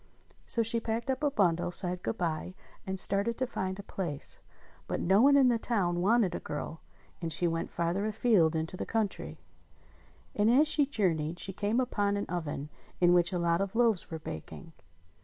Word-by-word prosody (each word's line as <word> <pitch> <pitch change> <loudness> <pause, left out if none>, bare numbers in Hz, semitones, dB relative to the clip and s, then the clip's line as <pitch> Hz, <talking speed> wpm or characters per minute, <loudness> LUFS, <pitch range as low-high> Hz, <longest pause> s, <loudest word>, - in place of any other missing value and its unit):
So 230 - +1
she 230 +1 +2
packed 230 +3 -2
up 265 +3 -4
a 295 - +3
bundle, 175 -10 +1
said 180 0 +2
good 225 - -3
bye, 170 +1 -3 0.3
and 190 0 0
started 200 +5 +2
to 260 - 0
find 190 -7 -4
a 200 - -8
place; 170 -8 -4 0.5
but - - -2
no 190 +4 +3
one 280 +2 +6
in 265 -2 +5
the 235 -2 +1
town 180 -7 0
wanted 205 -1 +3
a - - -3
girl, 155 +2 -6 0.4
and 165 -1 -3
she 170 +3 +1
went 165 0 -2
farther 175 +4 -1
afield 210 -7 +2
into 160 +3 -3
the - - -5
country. 220 -3 -2 1.0
And 210 +1 +2
as 280 +6 +5
she 295 -2 +2
jour 210 -11 +1
neyed 155 +2 -4
she 195 +2 -3
came 210 +5 0
upon 205 -5 0
an 200 - -2
oven 150 -4 -4 0.3
in 175 0 +5
which 175 0 +3
a 180 - -1
lot 170 +1 +1
of 195 +2 -3
loaves 230 -5 +2
were 160 - -4
baking. 160 - -9
190 Hz, 195 wpm, -30 LUFS, 170-225 Hz, 1.0 s, one